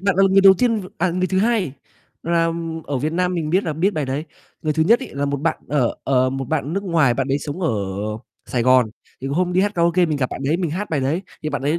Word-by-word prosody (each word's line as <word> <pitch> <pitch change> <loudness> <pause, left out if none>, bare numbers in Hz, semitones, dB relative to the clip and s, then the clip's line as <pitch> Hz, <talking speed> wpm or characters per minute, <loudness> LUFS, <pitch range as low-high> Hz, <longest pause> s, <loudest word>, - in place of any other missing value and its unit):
bạn 195 -1 +1
là 195 - +5
người 195 - +6
đầu 195 0 +8
tiên 235 -3 +2
v 185 - -8
à, 180 0 +1
người 185 +1 0
thứ 185 +1 0
hai 210 - +1 0.5
là 165 0 +1 0.3
ở 140 -2 -2
Việt 155 +4 -1
Nam 180 +1 0
mình 160 -3 -2
biết 185 +4 +2
là 160 - -1
biết 170 +7 +1
bài 155 -7 -2
đấy. 135 +4 -2 0.4
Người 155 - 0
thứ 160 +1 +2
nhất 225 +9 +5
ấy 260 - -8
là 140 - -1
một 140 0 -1
bạn, 165 +2 0
ờ, 135 -4 +1
ờ, 130 -1 +2
một 135 0 -3
bạn 155 +3 -1
ở 145 - -5
nước 195 +4 -2
ngoài 160 -9 +3
bạn 135 +1 -1
đấy 135 - +1
sống 145 +5 -6
ở 165 - +1 0.8
Sài 120 - -1
Gòn, 125 -2 +4 0.3
thì 135 - -5
hôm 175 +6 0
đi 185 - +3
hát 205 +1 0
karaoke 170 +1 +3
mình 155 -2 -1
gặp 130 -3 -1
bạn - - -6
đấy 150 +4 +2
mình 175 -3 -2
hát 190 +7 -4
bài 150 -3 0
đấy, 145 +8 -1 0.2
thì 155 - -2
bạn 145 - -3
ấy 150 +4 +1
160 Hz, 285 wpm, -21 LUFS, 140-185 Hz, 0.8 s, đầu